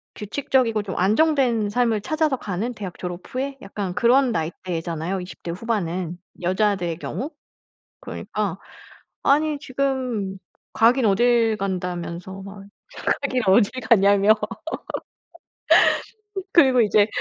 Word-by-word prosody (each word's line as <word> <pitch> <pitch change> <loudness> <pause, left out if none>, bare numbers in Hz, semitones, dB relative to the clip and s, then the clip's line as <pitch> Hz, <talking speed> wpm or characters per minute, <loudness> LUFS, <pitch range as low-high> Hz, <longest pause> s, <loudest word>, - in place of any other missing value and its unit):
규칙적이고 225 0 0
좀 190 - -5
안정된 235 - +2
삶을 225 -2 +1
찾아서 310 0 0
가는 215 +5 -3
대학 195 -5 -7
졸업 180 0 -5
후에 270 +2 -4
약간 195 -2 -4
그런 250 +3 +4
나이대잖아요, 170 0 -3
20 180 - -10
대 170 - -3
후반은 180 -4 -2 0.2
여자들의 185 -2 0
경우. 255 - -5 0.7
그러니까 - - -4 0.7
"아니 300 +1 +3
지금 255 -8 -2 0.4
가긴 235 +2 +4
어딜 225 +1 +3
간다."면서 180 0 -4
막 195 0 -10 0.6
"가긴 255 -3 0
어딜 200 +2 +5 0.2
가냐."며 200 -1 +5 2.2
그리고 260 -7 +6
이제 210 -1 +4
210 Hz, 250 characters per minute, -23 LUFS, 185-250 Hz, 2.2 s, 그리고